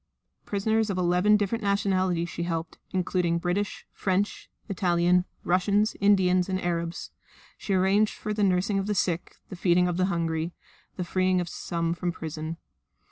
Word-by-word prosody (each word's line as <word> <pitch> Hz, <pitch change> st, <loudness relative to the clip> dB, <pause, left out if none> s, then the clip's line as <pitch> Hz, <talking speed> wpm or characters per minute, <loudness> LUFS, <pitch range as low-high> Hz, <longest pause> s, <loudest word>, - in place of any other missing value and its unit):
Prisoners 220 Hz, +2 st, +1 dB
of 195 Hz, -, -1 dB
eleven 180 Hz, +4 st, +4 dB
different 210 Hz, +2 st, -1 dB
nationalities 190 Hz, -4 st, +1 dB
she 170 Hz, -, -6 dB
helped 165 Hz, -1 st, -3 dB
including 180 Hz, -2 st, 0 dB
British, 180 Hz, +4 st, -2 dB
French, 195 Hz, +2 st, -1 dB, 0.2 s
Italian, 180 Hz, -2 st, +2 dB, 0.2 s
Russian, 200 Hz, +4 st, +2 dB
Indians 190 Hz, -2 st, +3 dB
and 185 Hz, 0 st, 0 dB
Arabs. 170 Hz, -1 st, -3 dB, 0.4 s
She 195 Hz, -, -2 dB
arranged 195 Hz, +3 st, +3 dB
for 215 Hz, -, -4 dB
the 210 Hz, 0 st, 0 dB
nursing 195 Hz, +1 st, +2 dB
of 195 Hz, -, -3 dB
the 210 Hz, -, 0 dB
sick, 175 Hz, -2 st, -1 dB
the 185 Hz, -, -6 dB
feeding 180 Hz, 0 st, +3 dB
of 175 Hz, -1 st, -1 dB
the 185 Hz, -, +2 dB
hungry, 165 Hz, -2 st, -1 dB, 0.4 s
the 180 Hz, -, -3 dB
freeing 185 Hz, +1 st, +1 dB
of 175 Hz, -, -2 dB
some 170 Hz, 0 st, -2 dB
from 175 Hz, +1 st, -2 dB
prison. 160 Hz, 0 st, -5 dB
180 Hz, 155 wpm, -27 LUFS, 175-200 Hz, 0.4 s, eleven